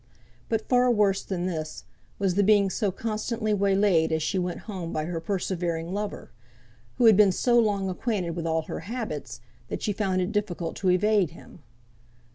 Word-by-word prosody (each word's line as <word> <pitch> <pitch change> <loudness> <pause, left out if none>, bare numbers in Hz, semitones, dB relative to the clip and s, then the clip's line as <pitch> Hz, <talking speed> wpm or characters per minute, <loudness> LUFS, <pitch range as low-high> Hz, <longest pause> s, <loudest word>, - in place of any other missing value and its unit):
But 225 -1 -1
far 250 0 +4
worse 205 -4 +3
than 180 -2 -3
this, 155 -4 -4 0.3
was 195 -2 +1
the 200 - +2
being 200 -1 +4
so 210 -1 0
constantly 215 +2 -2
waylaid 195 -4 +3
as 160 -1 0
she 185 +5 0
went 180 -1 -3
home 185 -6 -6
by 155 - -2
her 170 0 -3
persevering 175 -2 -2
lover; 205 +1 -4 0.6
who 245 - +2
had 220 -2 +8
been 205 -1 +6
so 240 +6 +3
long 205 -4 +1
acquainted 190 -2 -2
with 165 0 -4
all 160 0 0
her - - -6
habits, 220 - -5 0.3
that - - -5
she 210 - 0
found 190 -2 0
it 185 +2 -1
difficult 190 -6 -2
to 190 - 0
evade 195 0 +3
him. 165 +1 -15
195 Hz, 180 wpm, -26 LUFS, 175-210 Hz, 0.6 s, had